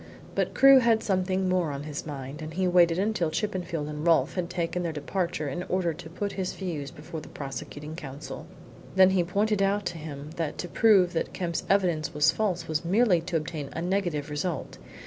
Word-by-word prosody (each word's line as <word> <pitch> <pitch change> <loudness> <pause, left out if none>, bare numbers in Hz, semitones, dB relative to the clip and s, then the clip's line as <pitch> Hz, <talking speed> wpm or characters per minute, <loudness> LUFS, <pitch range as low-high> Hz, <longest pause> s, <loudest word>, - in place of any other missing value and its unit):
But - - -1
Crewe 270 0 +8
had 230 -2 +3
something 185 -1 0
more 180 -3 +1
on 140 0 -4
his 150 0 -6
mind, 140 0 -6
and 155 0 -7
he 185 0 +1
waited 175 -2 +5
until 195 -4 +1
Chippenfield 170 -3 -2
and 150 0 -5
Rolfe 170 -1 +3
had 175 -2 -2
taken 175 0 -2
their 170 -2 -1
departure 155 +1 -2
in 140 +6 -3
order 180 -3 +1
to 160 +1 -10
put 200 +4 -3
his 185 -2 -3
views 160 -7 -4
before 155 +3 -8
the - - -11
prosecuting 150 +2 -7
counsel. 145 -2 -8 0.5
Then 190 0 +7
he 185 -2 +3
pointed 205 +3 +1
out 200 +1 +1
to 170 -1 -3
him 150 -1 -7
that 160 -3 -2
to 180 - -4
prove 195 -4 +4
that 165 - -2
Kemp's 170 -3 -2
evidence 170 -6 +1
was 150 +2 +5
false 180 -6 -1
was 155 0 -1
merely 190 0 +3
to 170 0 -1
obtain 155 -2 -5
a 165 - -3
negative 175 -6 -1
result. 150 +1 -3
170 Hz, 200 wpm, -27 LUFS, 155-190 Hz, 0.5 s, Crewe